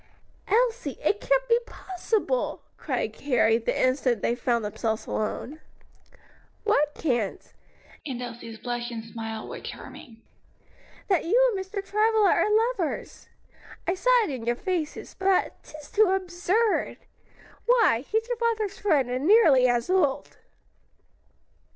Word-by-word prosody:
"Elsie, 475 +3 +1
it 410 - +1
can't - - +1
be 470 0 +4
possible!" 430 +6 -2
cried - - -3
Carrie, 240 -5 +2
the 230 - -2
instant 255 -4 +1
they - - +2
found 240 -2 0
themselves 220 +1 -2
alone. 255 +7 -3 1.0
"What 300 -9 +2
can't?" 240 -9 -2 0.5
and 260 -5 -5
Elsie's 235 -2 -7
blush 240 +1 -4
and 230 -2 -6
smile 225 -1 -6
were - - -7
charming. 230 -4 -10 0.8
"That 375 -4 +1
you - - +4
and 380 - -2
Mr. 390 +1 -6
Travilla 430 0 +3
are 425 - +2 0.2
lovers! 355 -10 -5 0.6
I 355 - +2
saw 380 +7 -1
it 375 - -3
in 255 -4 -5
your 240 - +2
faces; 340 0 -4
but, 380 -1 0
'tis 305 -1 -13
too 435 0 +5
absurd! 375 +4 0 0.7
Why, 475 - +4
he's 440 +1 0
your 485 -1 -2
father's 445 -4 -1
friend, 295 -11 +2
and 255 +4 -2
nearly 315 - +6
as 240 -1 +1
old." 360 -8 0
335 Hz, 130 wpm, -26 LUFS, -, 1.0 s, nearly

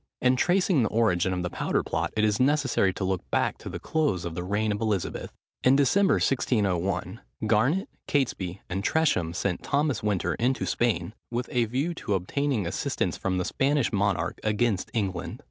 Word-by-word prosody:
In 125 0 +3
tracing 175 +1 +3
the 110 - +1
origin 95 -5 +2
of 90 -1 -2
the 90 - -2
powder - - 0
plot - - -2
it 105 - +3
is 105 -1 +2
necessary 130 -7 +2
to 95 - -5
look 95 -1 0
back - - 0
to - - -7
the - - -5
close 145 - 0
of 85 - -4
the 90 +1 -4
reign 105 +3 0
of 105 +1 -3
Elizabeth. 105 -5 -2 0.3
In 130 +1 +6
December, 190 +8 +4
1601, 95 -6 0 0.2
Garnet, 125 - +2 0.2
Catesby, 100 - -1
and 95 +2 -3
Tresham 105 - +2
sent 90 +1 -2
Thomas 140 -4 0
Winter 95 -4 0
into 130 +3 0
Spain, 120 -2 0 0.2
with 120 +1 -2
a 120 -2 +2
view 135 +10 -1
to 110 -11 -2
obtaining 120 +4 -1
assistance 85 - -1
from 95 -1 -2
the 90 - -1
Spanish 140 -3 +1
monarch 95 -4 0
against 110 -2 0
England. 95 -5 -2
110 Hz, 180 wpm, -27 LUFS, 95-135 Hz, 0.3 s, In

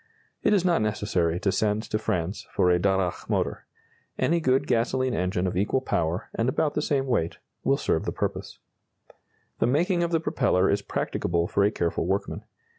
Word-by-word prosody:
It - - +2
is 195 -3 +3
not 175 -9 +3
necessary 95 -6 0
to 95 - +2
send 105 +2 0
to 110 - -2
France 90 -1 -2
for 90 - +4
a 90 - +3
Darracq 95 -1 0
motor. - - -1 0.5
Any 170 +2 +2
good 135 -2 +2
gasoline 130 0 +1
engine 90 0 0
of 90 - -1
equal 100 +8 +1
power, 85 -8 -1
and 115 +2 0
about 145 +3 0
the 150 - 0
same 140 -3 0
weight, 100 -11 0 0.3
will 135 +1 +3
serve 80 - 0
the - - -1
purpose. - - -4 1.0
The - - +3
making 175 +7 +2
of 170 - +1
the 165 -1 +2
propeller 115 - +2
is 100 0 +1
practicable 85 -3 -1
for 100 - +1
a 100 - +4
careful 85 -4 -1
workman. 95 +2 -2
105 Hz, 185 wpm, -26 LUFS, 90-135 Hz, 1.0 s, for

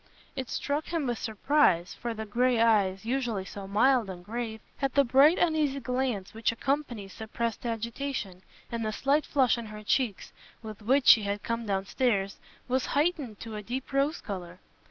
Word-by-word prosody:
It 260 -3 -4
struck 290 +2 -2
him 330 -4 -1
with 240 -3 -2
surprise, 220 - +2
for 235 -1 -5
the 220 0 -5
grey 240 +3 +2
eyes, 205 -4 +3
usually 235 -6 -1
so 195 0 -8
mild 225 +2 +3
and 175 -1 -8
grave, 225 0 -4 0.2
had 275 -1 -1
the 280 - +6
bright 275 +6 +5
uneasy 310 -5 +1
glance 250 -6 -2
which 225 0 0
accompanies 240 -6 -2
suppressed 230 +2 -4
agitation, 230 -4 -4 0.3
and 230 -1 -2
the 215 - -1
slight 280 +7 +1
flush 255 -4 +3
in 230 - -7
her 215 0 -9
cheeks, 220 -2 -1 0.3
with 215 -1 -8
which 255 +5 +2
she 225 - +8
had 200 0 -3
come 230 -1 -3
downstairs, 195 +1 0 0.3
was 260 +1 0
heightened 290 - 0
to 225 -1 -6
a 210 - -4
deep 250 +6 -5
rose 280 +4 +1
colour. 180 -3 -6
230 Hz, 175 wpm, -28 LUFS, 210-270 Hz, 0.3 s, she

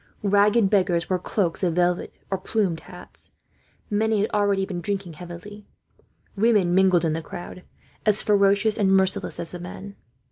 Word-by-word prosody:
Ragged 205 +1 +3
beggars 180 -4 +1
wore 185 - +1
cloaks 180 -2 -2
of 175 -4 0
velvet, 180 0 0 0.2
or 195 - -1
plumed 190 -4 -1
hats. 180 0 -13 0.6
Many 215 0 +1
had 210 - -1
already 200 -2 +1
been 185 -3 -5
drinking 195 -3 -3
heavily. 180 +5 -10 0.7
Women 205 -4 +2
mingled 185 -2 +4
in 160 - 0
the 165 - -3
crowd, 175 +2 -9 0.4
as 210 -1 +2
ferocious 205 +1 +2
and 195 -2 +3
merciless 190 0 +1
as 170 - -4
the 180 - -7
men. 195 +3 -9
195 Hz, 155 wpm, -24 LUFS, 175-205 Hz, 0.7 s, mingled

